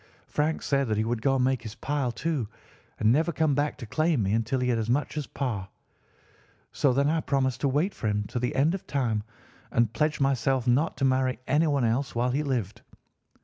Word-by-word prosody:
Frank 155 +2 -1
said 140 -2 +1
that 110 -1 0
he 110 - +2
would 115 0 -2
go 135 +2 +2
and 130 - +2
make 130 -2 +1
his 110 -1 -8
pile, 135 -1 -1
too, 140 -1 -2 0.5
and 110 - +4
never 160 +6 +2
come 155 -2 +1
back 145 +2 0
to - - -7
claim 155 +1 +1
me 100 +1 0
until 115 +4 0
he 125 0 0
had 120 -2 +1
as 110 0 -2
much 145 +6 0
as 150 -3 -3
Pa. 110 -9 -3 1.0
So 140 -3 +2
then 140 +3 +2
I 160 +1 +1
promised 130 -4 0
to 140 - +2
wait 150 +9 +1
for 110 - -4
him 105 0 0
to 125 - -2
the 125 +1 -2
end 145 +5 +3
of 195 - -6
time 120 -6 0 0.5
and 115 -1 +1
pledged 150 +3 0
myself 135 -2 +1
not 130 +6 +2
to 135 - +1
marry 130 -1 +2
anyone 145 -3 +2
else 120 +4 -1
while 125 +2 +1
he 140 +4 0
lived. 120 -9 -2
130 Hz, 220 wpm, -27 LUFS, 115-145 Hz, 1.0 s, and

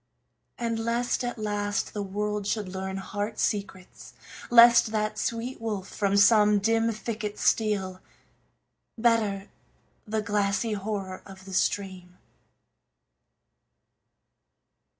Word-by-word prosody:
And 230 -1 -2
lest, 235 +2 -1
at 245 0 -3
last, 205 -1 -2
the 210 - -3
world 205 +1 -3
should 210 -2 -1
learn 190 +1 -5
heart 205 +3 -4
secrets; 200 -3 -4 0.4
Lest 235 0 +8
that 215 -1 -1
sweet 235 +2 -3
wolf 210 -4 -3
from 200 -1 0
some 210 0 +6
dim 225 +2 +2
thicket 215 -1 -5
steal; 195 -4 0 1.0
Better 220 -4 +1 0.6
the 215 0 -1
glassy 205 +2 0
horror 200 -2 -4
of 190 -1 -13
the 190 - -9
stream. 185 -2 -2
210 Hz, 105 wpm, -27 LUFS, 195-225 Hz, 1.0 s, Lest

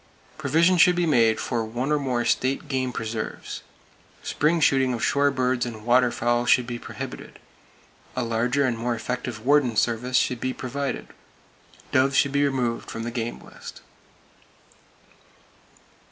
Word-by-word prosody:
Provision 165 +5 +3
should 180 +1 +6
be 175 0 +1
made 115 -7 +3
for 120 -3 -2
one 120 +6 -3
or 150 - +2
more 125 -3 -1
state 135 +3 0
game 130 -2 -1
preserves. 110 -1 -5 0.6
Spring 160 +3 +1
shooting 135 -4 +3
of 115 - -1
shore 145 0 +3
birds 130 -2 0
and 110 -4 -6
waterfowl 120 -1 +2
should 125 0 +4
be 120 -1 -5
prohibited. - - -8 0.8
A 130 - -1
larger 120 +4 +1
and 125 -2 0
more 120 +1 -1
effective 120 -2 -5
warden 140 -4 +3
service 120 +3 +1
should 125 - +1
be 130 +1 -2
provided. 140 +3 -4 0.8
Doves 130 +1 +3
should 140 - +3
be 140 +1 +2
removed 125 -4 -2
from 115 - -5
the 120 - -4
game 120 -1 -4
list. - - -11
125 Hz, 145 wpm, -24 LUFS, 120-140 Hz, 0.8 s, should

